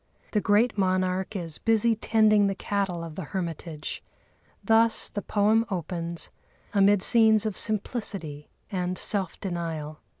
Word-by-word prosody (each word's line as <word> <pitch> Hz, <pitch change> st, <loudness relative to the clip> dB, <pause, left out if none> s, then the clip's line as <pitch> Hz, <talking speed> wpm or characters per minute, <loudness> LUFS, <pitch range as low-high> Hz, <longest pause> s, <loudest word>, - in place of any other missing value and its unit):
The 210 Hz, -, +1 dB
great 215 Hz, +2 st, +2 dB
monarch 185 Hz, +1 st, 0 dB
is 165 Hz, -5 st, -4 dB
busy 225 Hz, 0 st, +3 dB
tending 215 Hz, -1 st, +3 dB
the 195 Hz, -, -1 dB
cattle 195 Hz, -4 st, -2 dB
of 165 Hz, -2 st, -7 dB
the 190 Hz, -, -6 dB, 0.2 s
hermitage. 165 Hz, -3 st, -5 dB, 0.6 s
Thus 225 Hz, 0 st, +3 dB
the 205 Hz, -, -4 dB
poem 215 Hz, +2 st, +2 dB
opens, 170 Hz, -2 st, -4 dB, 0.4 s
amid 200 Hz, -1 st, +4 dB
scenes 220 Hz, -2 st, +5 dB
of 215 Hz, -3 st, -2 dB
simplicity 195 Hz, -9 st, -3 dB, 0.2 s
and 180 Hz, -1 st, -2 dB
self 195 Hz, -5 st, -2 dB
denial. 165 Hz, -5 st, -4 dB
195 Hz, 130 wpm, -26 LUFS, 170-215 Hz, 0.6 s, scenes